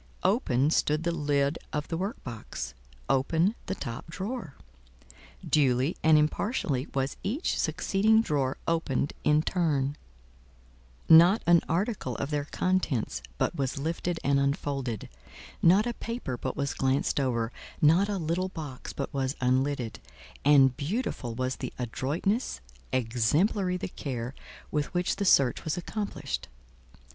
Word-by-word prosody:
Open 155 - +2
stood 155 0 +2
the 170 - +1
lid 145 -2 0
of 150 -1 -2
the 165 - -1
work 195 +6 -4
box, 115 -3 -6 0.3
open 160 +9 +2
the 190 - -2
top 115 -4 -6
drawer; 190 - -5 0.9
duly 135 +1 +2
and 160 -1 +6
impartially 150 - 0
was 135 0 -1
each 250 - -1
succeeding 220 +3 +3
drawer 145 -10 0
opened 160 -4 0
in 150 +1 +4
turn: 145 -7 0 1.1
not 170 +6 +7
an 170 0 +6
article 175 - -1
of 140 - -3
their 145 -1 -1
contents 180 -8 -1 0.2
but - - 0
was 135 -1 -2
lifted 165 +3 -2
and 140 0 +3
unfolded, 140 - -1 0.5
not 190 +6 +5
a 240 - -1
paper 230 - -4
but 130 +2 -4
was 140 0 -1
glanced 135 +2 +1
over, 120 -4 0 0.3
not 170 +7 +4
a 205 - -1
little 175 +2 -1
box 150 -8 -7
but 140 - -4
was 135 0 -1
unlidded; 130 -2 0 0.4
and 135 -3 +6
beautiful 145 - -2
was 130 +1 -2
the - - -5
adroitness, 150 - -1 0.3
exemplary 145 - +1
the - - -4
care 125 -7 -5 0.4
with 150 -2 -1
which 180 +2 +1
the 200 - -1
search 135 -8 +4
was 160 +2 -2
accomplished. 205 +4 -4
150 Hz, 135 wpm, -28 LUFS, 135-180 Hz, 1.1 s, not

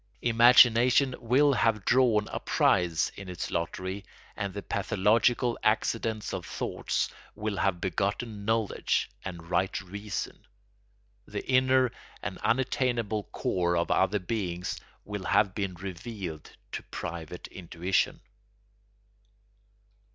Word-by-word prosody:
Imagination 120 +2 +6
will 135 +5 +4
have 115 -5 +1
drawn 120 -5 +4
a - - -3
prize 85 -3 +2
in 95 -1 -8
its 90 - -5
lottery 95 +4 -3 0.3
and 100 -2 -3
the 100 +1 -6
pathological 110 +5 +2
accidents 110 0 0
of - - -3
thought - - -2 0.3
will 105 -1 -3
have 95 -2 +1
begotten 100 +4 -2
knowledge 110 0 0
and 85 -2 -8
right 95 +1 +1
reason. 100 +2 -5 0.8
The - - -5
inner 130 -1 +4 0.3
and - - -4
unattainable 120 -4 0
core 85 -1 0
of 85 - 0
other 95 +2 +3
beings 90 -3 -3 0.3
will 100 -2 -5
have 95 +3 +3
been 95 -3 -3
revealed 90 -2 -6 0.2
to - - -4
private 85 +1 -7
intuition. 90 +1 -1
100 Hz, 110 wpm, -28 LUFS, 95-115 Hz, 0.8 s, Imagination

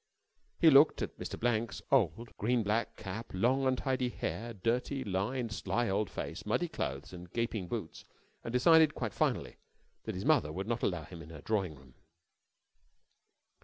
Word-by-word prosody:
He 165 -2 +7
looked 145 +3 +6
at - - -6
Mr. - - -5
Blank's 115 -1 0
old 115 - +2
green 120 +2 +1
black 110 +3 0
cap, 105 +2 -6
long, 130 +7 +2
untidy 130 -1 0
hair, 120 -1 -4
dirty, 120 +6 -1
lined, 110 +5 -1
sly 120 +1 -1
old 100 +1 0
face, - - -5
muddy - - 0
clothes 70 +6 -4
and 90 -1 -10
gaping 115 -5 -2
boots, - - -5 0.4
and 115 - -4
decided 155 +5 +5
quite 115 -5 -3
finally - - 0 0.5
that - - -3
his 95 - -4
mother 75 - +3
would 95 +5 -4
not 120 +1 -2
allow 90 -5 0
him 85 +2 -10
in 80 - -11
her 80 -3 -9
drawing 95 -6 -1
room. 65 -2 -18
115 Hz, 165 wpm, -32 LUFS, 95-125 Hz, 0.5 s, He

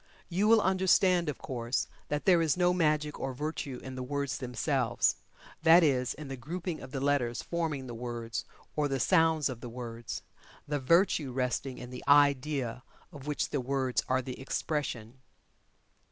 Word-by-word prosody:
You 190 +4 +1
will 225 0 +6
understand, 185 -2 +3
of 145 - -3
course, 120 -1 -2 0.2
that 150 0 -2
there 180 -3 +5
is 160 0 +2
no 180 0 +3
magic 150 -3 +1
or 135 -1 -3
virtue 145 -2 -4
in 130 - -7
the 130 - -5
words 140 +2 -2
themselves 125 -1 0 0.4
that 165 +2 +7
is, 130 -5 +2
in 150 0 -8
the 135 - -5
grouping 165 +6 -5
of 130 - -9
the 135 - -3
letters 135 -4 0
forming 160 -6 -2
the 120 - -7
words, 115 -1 -4 0.3
or 150 -1 +1
the 135 -1 -1
sounds 160 -1 +3
of 125 -4 -6
the 120 - -6
words 115 -1 -6 0.4
the 145 0 -1
virtue 155 0 +3
resting 125 +1 -2
in 125 0 -8
the 125 - -7
idea 140 -3 +3 0.3
of 145 -1 -11
which 150 - -1
the 140 - 0
words 130 0 0
are 130 0 +2
the 125 0 -6
expression. 130 -4 -3
140 Hz, 170 wpm, -30 LUFS, 125-160 Hz, 0.4 s, that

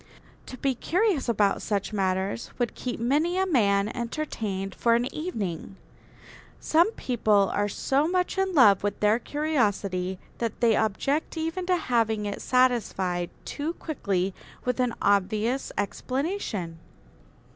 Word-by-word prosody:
To 255 - -8
be 270 0 0
curious 350 - 0
about 205 -3 +2
such 205 0 -2
matters 190 +2 -1
would 240 -2 -1
keep 250 -3 -4
many 300 +9 +1
a 380 - +2
man 205 - +3
entertained 220 -6 -3
for 235 -1 +2
an 240 +1 +1
evening. 205 - -4 0.8
Some 340 +7 +3
people 215 - +2
are 205 0 0
so 275 +8 +1
much 360 +1 0
in 385 -1 0
love 205 -9 +6
with 205 0 -2
their 210 +2 +3
curiosity 205 -12 -1 0.2
that 230 -2 -2
they 230 -2 +4
object 275 - 0
even 330 +3 -2
to 365 -1 +3
having 225 -7 0
it 205 -1 -4
satisfied 195 -9 +1 0.2
too 305 +3 -3
quickly 195 - -2 0.3
with 250 +1 -1
an 250 -2 +1
obvious 210 +6 +1
explanation. 220 - -3
235 Hz, 135 wpm, -26 LUFS, 200-295 Hz, 0.8 s, love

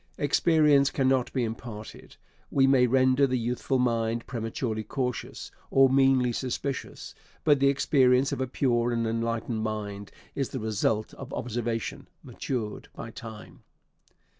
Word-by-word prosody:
Experience 145 -1 +4
cannot 130 -2 +1
be 130 - -1
imparted. 110 -1 -7 0.3
We 135 -1 +3
may 135 -2 +4
render 130 +2 +3
the 130 -1 0
youthful 125 +3 -1
mind 115 -2 0
prematurely 115 -2 -3
cautious, 125 0 -4 0.2
or 135 0 +5
meanly 135 -2 +4
suspicious; 130 +3 -4 0.3
but 145 -2 +4
the 140 - +4
experience 135 -1 +3
of - - -3
a 130 - -1
pure 120 -2 +1
and 115 -1 0
enlightened 115 0 -2
mind 105 -2 -4 0.2
is 135 -2 -2
the 130 - -5
result 110 0 -1
of - - -10
observation, 115 -1 -3 0.2
matured 115 -5 -5
by 115 - -7
time. 110 -2 -10
125 Hz, 135 wpm, -27 LUFS, 115-135 Hz, 0.3 s, or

